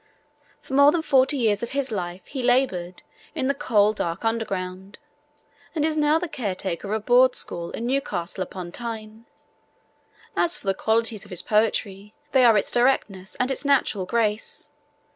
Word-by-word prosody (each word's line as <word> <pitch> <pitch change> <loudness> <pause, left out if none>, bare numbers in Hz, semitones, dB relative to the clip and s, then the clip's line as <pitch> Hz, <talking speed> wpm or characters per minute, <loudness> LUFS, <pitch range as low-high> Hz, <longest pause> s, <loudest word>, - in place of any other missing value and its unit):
For - - -10
more 280 +1 +7
than 330 -1 -1
forty 275 -1 +3
years 215 -5 +1
of 235 +2 -5
his 270 -3 -1
life 180 -2 -4
he 270 - -5
laboured 240 -9 0 0.3
in 260 - -1
'the 280 - +2
coal 215 -7 +2
dark 170 0 -3
underground,' 195 -4 -3 0.8
and 305 -1 +1
is 315 -1 0
now 300 0 +3
the 350 +2 -3
caretaker 195 - -3
of 205 - -2
a - - -1
Board 250 +3 +4
school 170 0 -4
in 230 - -5
Newcastle 240 -9 -2
upon 185 -1 -6
Tyne. 225 0 -7 1.1
As 345 0 +3
for - - -14
the 195 - +2
qualities 220 0 0
of 200 - -14
his 180 -2 -3
poetry, 210 -1 0 0.2
they 260 -2 +4
are 230 -3 +6
its 200 - 0
directness 215 -7 +1
and 250 +2 0
its 270 - -3
natural 260 -9 +1
grace. 220 -1 -1
225 Hz, 170 wpm, -24 LUFS, 195-260 Hz, 1.1 s, more